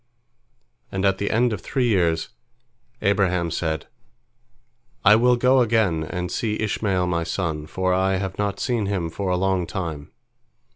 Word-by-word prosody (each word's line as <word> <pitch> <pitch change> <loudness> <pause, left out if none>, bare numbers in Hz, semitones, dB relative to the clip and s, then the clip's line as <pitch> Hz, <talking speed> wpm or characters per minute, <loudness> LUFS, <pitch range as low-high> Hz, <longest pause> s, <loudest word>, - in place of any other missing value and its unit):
And 95 0 -1
at 95 -1 +2
the 100 - -1
end 120 +1 +2
of 105 - -5
three 125 +3 0
years, 85 -7 +1 0.7
Abraham 90 -4 +1
said, 80 -1 -2 1.2
"I 105 - +8
will 125 +2 +4
go 125 +2 +4
again 105 -9 +2
and 90 +2 -4
see 110 -2 -2
Ishmael 100 -3 0
my 85 -1 0
son, 80 -3 -3
for 95 +3 0
I 95 +1 +2
have 95 0 -4
not 100 -1 -1
seen 115 -5 -1
him 90 -5 -2
for 95 +2 -3
a 90 - +1
long 95 -2 0
time." 80 -6 -5
95 Hz, 155 wpm, -23 LUFS, 85-105 Hz, 1.2 s, I